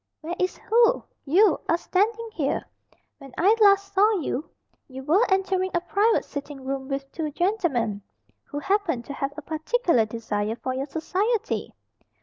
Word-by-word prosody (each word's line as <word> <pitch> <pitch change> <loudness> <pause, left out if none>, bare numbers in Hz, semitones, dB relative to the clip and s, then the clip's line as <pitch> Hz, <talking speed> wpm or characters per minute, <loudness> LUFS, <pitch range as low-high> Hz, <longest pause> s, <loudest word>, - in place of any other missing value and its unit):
"Where 325 +2 -4
is 365 0 0
who? 470 +2 +3 0.2
You 360 +4 +4
are 335 - +4
standing 435 +6 0
here. 285 -7 -1 0.5
When 275 -3 -13
I 395 +6 +5
last 395 -1 +5
saw 415 +3 +4
you, 295 -1 -3 0.4
you 265 0 -9
were 335 - +4
entering 380 -1 +1
a 345 - +2
private 415 +5 +2
sitting 285 -2 -7
room 270 0 -3
with 275 0 -4
two 315 -2 -3
gentlemen 295 - 0 0.4
who 290 - -7
happened 330 - 0
to 280 - -6
have 275 0 -3
a 310 - -7
particular 320 - +1
desire 215 -1 -2
for 255 +2 -4
your 265 +2 -3
society." 385 - -1
325 Hz, 155 wpm, -25 LUFS, 275-395 Hz, 0.5 s, I